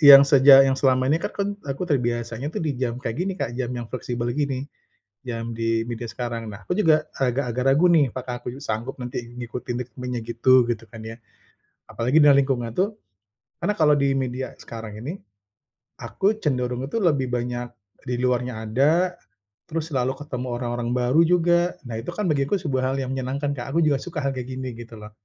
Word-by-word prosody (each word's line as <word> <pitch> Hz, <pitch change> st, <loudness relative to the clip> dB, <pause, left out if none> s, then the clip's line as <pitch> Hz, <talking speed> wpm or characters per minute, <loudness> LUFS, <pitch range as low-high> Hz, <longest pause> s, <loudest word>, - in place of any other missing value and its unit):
yang 140 Hz, -2 st, +11 dB
sejak, 135 Hz, -1 st, +8 dB
yang 135 Hz, -, +3 dB
selama 130 Hz, -1 st, +3 dB
ini 160 Hz, -, +3 dB
kan -, -, -3 dB
kan 200 Hz, 0 st, 0 dB, 0.2 s
aku 135 Hz, +6 st, -2 dB
terbiasanya 120 Hz, -2 st, -1 dB
tuh -, -, -2 dB
di 150 Hz, -, 0 dB
jam 120 Hz, -2 st, -1 dB
kayak 115 Hz, -3 st, -4 dB
gini 190 Hz, +2 st, 0 dB
Kak, 115 Hz, -, -2 dB
jam 125 Hz, -2 st, -2 dB
yang 120 Hz, -, -4 dB
fleksibel 120 Hz, -1 st, -3 dB
gini, 140 Hz, -1 st, -1 dB, 0.6 s
jam 115 Hz, -1 st, -4 dB
di 115 Hz, 0 st, 0 dB
media 120 Hz, 0 st, -5 dB
sekarang. 115 Hz, -1 st, -4 dB
Nah 100 Hz, 0 st, -11 dB
aku -, -, -1 dB
juga, 155 Hz, -6 st, +4 dB
agak-agak 125 Hz, -2 st, 0 dB
ragu 150 Hz, +6 st, +5 dB
nih 150 Hz, -5 st, +5 dB
apakah 125 Hz, -1 st, -5 dB
aku 125 Hz, +2 st, -6 dB
sanggup 115 Hz, +3 st, -3 dB
nanti 125 Hz, 0 st, -4 dB, 0.2 s
ngikutin 120 Hz, 0 st, -5 dB
ritmenya 125 Hz, 0 st, -5 dB
gitu, 120 Hz, +2 st, +4 dB
gitu 115 Hz, -1 st, -2 dB
kan 110 Hz, 0 st, -10 dB
ya. 115 Hz, -, -7 dB, 0.7 s
Apalagi 125 Hz, +7 st, +2 dB
dalam 140 Hz, -1 st, +7 dB
lingkungan 125 Hz, -4 st, -1 dB
itu, 200 Hz, +4 st, 0 dB, 0.7 s
karena 205 Hz, +4 st, +2 dB
kalau 150 Hz, -2 st, +5 dB
di 140 Hz, -1 st, +2 dB
media 130 Hz, 0 st, -3 dB
sekarang 110 Hz, -2 st, -8 dB
ini, 160 Hz, +11 st, -5 dB, 0.8 s
aku 205 Hz, +3 st, 0 dB
cenderungnya 125 Hz, -2 st, -1 dB
tuh 230 Hz, -, 0 dB
lebih 140 Hz, -6 st, +2 dB
banyak 120 Hz, 0 st, -2 dB, 0.4 s
di 125 Hz, -, 0 dB
luarnya 125 Hz, -1 st, 0 dB
ada, 155 Hz, +11 st, +3 dB, 0.6 s
terus 165 Hz, 0 st, -3 dB
selalu 130 Hz, -1 st, +1 dB
ketemu 130 Hz, -4 st, -5 dB
orang-orang 120 Hz, -1 st, -3 dB
baru 125 Hz, +5 st, +3 dB
juga. 175 Hz, 0 st, +4 dB, 0.3 s
Nah 115 Hz, -2 st, -5 dB
itu 115 Hz, -, -12 dB
kan 210 Hz, -, -1 dB
bagiku 140 Hz, +6 st, +1 dB
sebuah 130 Hz, -6 st, 0 dB
hal -, -, -1 dB
yang 130 Hz, 0 st, -3 dB
menyenangkan 135 Hz, +2 st, -2 dB
Kak, 120 Hz, +2 st, -6 dB
aku -, -, +5 dB
juga 145 Hz, -3 st, +3 dB
suka 165 Hz, -1 st, -5 dB
hal 135 Hz, -, +1 dB
kayak 125 Hz, -1 st, -5 dB
gini 130 Hz, -1 st, -4 dB
gitu 115 Hz, -1 st, -10 dB
loh. 105 Hz, 0 st, -10 dB
130 Hz, 190 wpm, -24 LUFS, 120-145 Hz, 0.8 s, yang